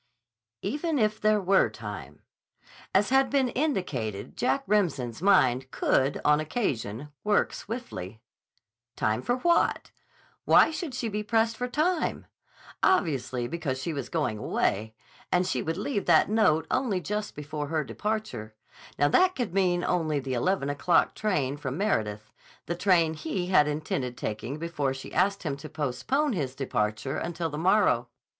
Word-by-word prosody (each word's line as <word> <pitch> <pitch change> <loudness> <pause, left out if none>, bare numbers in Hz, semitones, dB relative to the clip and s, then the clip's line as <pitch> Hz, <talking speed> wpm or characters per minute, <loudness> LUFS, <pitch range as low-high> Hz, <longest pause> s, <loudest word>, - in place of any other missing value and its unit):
D. 195 - -1
C. - - -4
"Even 310 +1 -1
if 215 -2 +1
there 215 0 +4
were 190 - +3
time." 105 - -8 0.7
As 200 +2 +3
has 270 0 +5
been 270 -3 +2
indicated, 155 - -2
Jack 270 +3 0
Remsen's 160 - 0
mind 130 -10 +3
could, 135 +1 +1
on 150 0 +5
occasion, 145 - -2
work 210 0 +2
swiftly. 115 - -6 0.8
Time 110 +2 0
for 245 - 0
what? 340 +6 +1 0.5
Why - - +6
should 315 -4 -5
she 240 - -2
be 210 -1 -2
pressed 225 +1 +1
for 250 +2 -3
time? 315 +6 0 0.6
Obviously, 135 - +1
because 140 -3 -3
she 160 +5 -3
was 140 -4 -4
going 110 - -1
away. 110 +1 -1 0.4
And 180 0 +3
she 185 - -1
would 160 +1 -3
leave 225 -9 -2
that - - +5
note 160 -8 +3
only 215 -8 +1
just 210 +3 -4
before 150 0 -5
her 155 0 0
departure. 135 - -4 0.4
That 360 - +4
could 240 -8 -3
mean 180 -2 +2
only 155 -4 0
the 135 -1 -4
eleven 140 +5 0
o'clock 155 +5 +2
train 145 -10 -1
from 140 -1 -4
Meredith: 110 - -1 0.3
the 170 - -2
train 170 -3 +3
he 160 +4 -3
had 150 -6 +5
intended 145 -5 -3
taking 115 +6 -4
before 150 -5 -2
she 135 - -9
asked 200 +2 +1
him 145 -5 -2
to 140 - -9
postpone 240 - -1
his 135 -8 -3
departure 130 +1 -2
until 170 -1 -3
the 150 - -4
morrow. 180 - +3
165 Hz, 155 wpm, -27 LUFS, 130-210 Hz, 0.8 s, Why